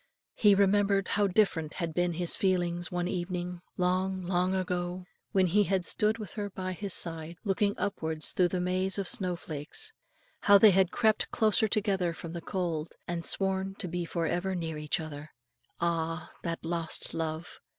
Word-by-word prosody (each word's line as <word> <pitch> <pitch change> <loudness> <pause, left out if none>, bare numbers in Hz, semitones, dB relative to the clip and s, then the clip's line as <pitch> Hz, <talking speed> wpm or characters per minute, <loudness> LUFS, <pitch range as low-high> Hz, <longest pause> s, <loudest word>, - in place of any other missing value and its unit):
He 205 -2 +5
remembered 200 0 +3
how 205 -1 +2
different 180 -6 +1
had 170 -3 -3
been 175 +1 +1
his 175 +1 +1
feelings 175 -2 0
one 175 0 -1
evening, 180 -1 -3 0.2
long, 185 +1 0
long 180 +1 +1
ago, 180 -1 -2 0.3
when 190 -1 +4
he 200 +4 +3
had 185 -1 +1
stood 215 +1 +2
with 215 -5 -6
her 205 -2 -3
by 185 -1 -4
his 200 +2 -5
side, 165 0 -3
looking 200 0 +1
upwards 160 -6 -2
through 180 - +3
the 180 +1 -2
maze 185 +2 0
of 195 -2 -2
snow 185 -6 +2
flakes, 170 - -5 0.5
how 200 0 +7
they 210 +1 +8
had 190 -1 +4
crept 220 +1 +2
closer 220 0 +3
together 195 -5 +1
from 165 0 -7
the 170 - -5
cold, 170 -4 -3
and 170 -1 -2
sworn 195 0 0
to 205 -2 -5
be 175 +1 -2
for 170 0 -2
ever 185 +3 -1
near 160 -3 -3
each 150 -1 -1
other. 155 -1 -7 0.5
Ah, 165 -1 -1
that 165 -1 -4
lost 165 -1 0
love! 160 +1 -4
180 Hz, 175 wpm, -30 LUFS, 170-195 Hz, 0.5 s, they